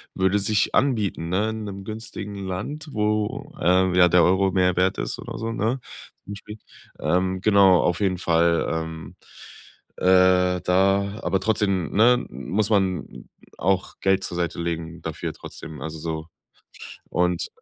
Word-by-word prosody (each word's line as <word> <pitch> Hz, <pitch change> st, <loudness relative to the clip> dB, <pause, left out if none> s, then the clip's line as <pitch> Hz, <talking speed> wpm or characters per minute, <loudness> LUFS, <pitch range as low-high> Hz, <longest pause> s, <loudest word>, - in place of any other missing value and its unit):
würde 95 Hz, +2 st, +2 dB
sich 105 Hz, +1 st, +1 dB
anbieten, 105 Hz, -10 st, 0 dB
ne, 100 Hz, +5 st, +1 dB
in 110 Hz, 0 st, -5 dB
'nem 100 Hz, -1 st, -7 dB
günstigen 105 Hz, -1 st, -7 dB
Land, 145 Hz, -, -5 dB
wo, 105 Hz, +7 st, -1 dB
ähm, 90 Hz, +1 st, +3 dB
ja, 90 Hz, -1 st, +6 dB
der 90 Hz, 0 st, +5 dB
Euro 95 Hz, +1 st, +3 dB
mehr 90 Hz, -1 st, +2 dB
wert 95 Hz, +1 st, +2 dB
ist -, -, -3 dB
oder -, -, -7 dB
so, 115 Hz, 0 st, -3 dB
ne, 115 Hz, +4 st, -1 dB, 0.5 s
zum 100 Hz, -, -7 dB
Beispiel. 105 Hz, +1 st, -10 dB, 0.4 s
Ähm, 95 Hz, +1 st, 0 dB
genau, 100 Hz, -3 st, +5 dB
auf 85 Hz, -1 st, 0 dB
jeden 95 Hz, -2 st, +1 dB
Fall, 85 Hz, -1 st, +2 dB
ähm. 80 Hz, -2 st, -5 dB, 0.8 s
Äh, 90 Hz, -1 st, +4 dB
da 100 Hz, +3 st, +1 dB
aber 95 Hz, +2 st, +1 dB
trotzdem, 100 Hz, -5 st, 0 dB
ne, 120 Hz, +4 st, +4 dB
muss 95 Hz, -, -2 dB
man 95 Hz, -6 st, -1 dB, 0.3 s
auch 95 Hz, +1 st, 0 dB
Geld 95 Hz, 0 st, +2 dB
zur -, -, -4 dB
Seite 85 Hz, -1 st, -2 dB
legen 85 Hz, 0 st, -4 dB
dafür 80 Hz, -1 st, -4 dB
trotzdem, 80 Hz, -3 st, -10 dB
also, 80 Hz, +2 st, -6 dB
so. 80 Hz, 0 st, -4 dB, 0.9 s
Und. 90 Hz, 0 st, 0 dB
95 Hz, 150 wpm, -23 LUFS, 90-105 Hz, 0.9 s, ja